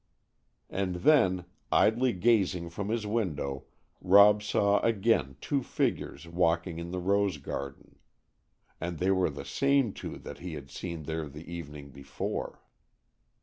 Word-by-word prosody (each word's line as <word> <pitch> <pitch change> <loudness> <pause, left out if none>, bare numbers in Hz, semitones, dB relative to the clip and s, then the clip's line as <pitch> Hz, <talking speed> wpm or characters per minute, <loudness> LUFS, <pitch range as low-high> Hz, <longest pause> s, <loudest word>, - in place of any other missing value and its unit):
And 95 -2 -1
then, 95 - +3 0.3
idly 120 +4 +4
gazing 95 -4 +1
from 100 +4 -4
his 115 -1 -1
window 80 - -2 0.4
Rob 100 +2 +7
saw 100 0 +2
again 110 - +1
two 140 -2 -1
figures 85 - -2
walking 85 0 0
in 85 0 -6
the 90 - -4
rose 100 -1 +1
garden. 70 0 -7 0.8
And 85 0 -4
they 95 +4 +1
were 95 -2 +2
the 70 -1 -7
same 140 - +2
two - - -7
that - - -9
he 90 -3 -6
had 70 -2 -9
seen 85 0 -6
there 80 0 -4
the 75 +4 -10
evening 75 -4 -8
before. 70 0 -5
90 Hz, 140 wpm, -29 LUFS, 80-105 Hz, 0.8 s, Rob